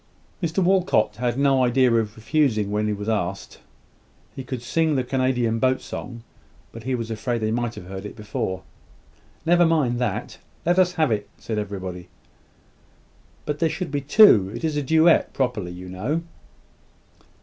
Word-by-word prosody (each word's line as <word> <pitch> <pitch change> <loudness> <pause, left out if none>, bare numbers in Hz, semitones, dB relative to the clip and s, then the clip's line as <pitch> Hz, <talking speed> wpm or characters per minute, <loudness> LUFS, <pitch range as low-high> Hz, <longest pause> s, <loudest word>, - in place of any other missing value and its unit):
Mr 170 +2 0
Walcot 175 - +2
had 120 +1 -1
no 135 -2 +3
idea 125 0 +3
of 110 -2 0
refusing 115 -4 +1
when 105 +1 0
he - - 0
was 105 +1 -6
asked. 100 -4 -3 0.8
He 135 - -6
could 125 -1 -6
sing 160 +3 +1
the 130 - +1
Canadian 125 -3 0
Boat 130 +2 +2
Song; 120 -2 -8 0.5
but 115 0 -11
he 130 -1 0
was 115 -2 -4
afraid 120 +2 -2
they 110 0 0
might 120 0 -2
have - - -9
heard 95 +1 -7
it 105 - -8
before. 105 -3 -4 0.8
"Never 175 +1 +5
mind 150 -8 +2
that. 125 - -3 0.3
Let 175 +2 +3
us 180 -1 +3
have 155 -7 +1
it," 105 -2 -2
said 110 -2 -3
everybody. 95 -3 -6 1.4
"But 150 0 -3
there 165 - +2
should 180 -1 -4
be 145 -1 -1
two: 135 - +6
it - - -7
is 155 -2 0
a 145 - 0
duet, 160 +4 +4
properly, 120 -9 -1
you 90 +1 -9
know." 115 - -2
120 Hz, 170 wpm, -23 LUFS, 105-150 Hz, 1.4 s, two